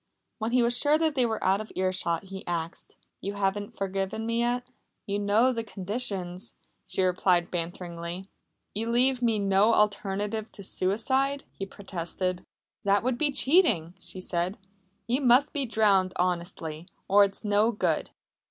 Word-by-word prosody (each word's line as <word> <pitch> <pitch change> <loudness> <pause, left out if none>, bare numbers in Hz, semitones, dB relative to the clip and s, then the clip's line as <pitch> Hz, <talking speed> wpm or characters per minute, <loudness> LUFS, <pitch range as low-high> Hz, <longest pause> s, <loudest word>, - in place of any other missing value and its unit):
When 220 0 -1
he 245 0 +3
was 240 +1 +2
sure 290 +4 +3
that 320 -1 +1
they 255 -4 +2
were 220 -1 -3
out 190 +2 +3
of 215 - -9
earshot 185 -2 0
he 190 0 -8
asked: 170 -1 -4 0.2
"You 200 - -4
haven't 200 0 -2
forgiven 195 +2 -2
me 230 0 0
yet?" 245 +1 -1 0.3
"You 200 0 -1
know 215 +5 +3
the 230 -1 -2
conditions," 200 -2 -2 0.3
she 190 - 0
replied 180 -1 +2
banteringly. 175 +1 -5 0.5
"You 225 +2 -2
leave 250 +2 +2
me 230 -3 +2
no 200 +2 +3
alternative 210 +1 0
to 200 - -9
suicide," 260 +10 0
he 195 - -6
protested. 185 -1 -4 0.4
"That 200 +1 +3
would 250 -1 0
be 295 -2 +3
cheating," 260 - +3
she 185 - -6
said. 180 +3 -2 0.5
"You 250 +4 0
must 260 +3 +4
be 280 -3 -1
drowned 200 -5 +3
honestly, 170 -2 -2 0.2
or 200 +1 +6
it's 200 +2 -1
no 210 +2 +3
good." 210 - 0
205 Hz, 155 wpm, -28 LUFS, 185-235 Hz, 0.5 s, or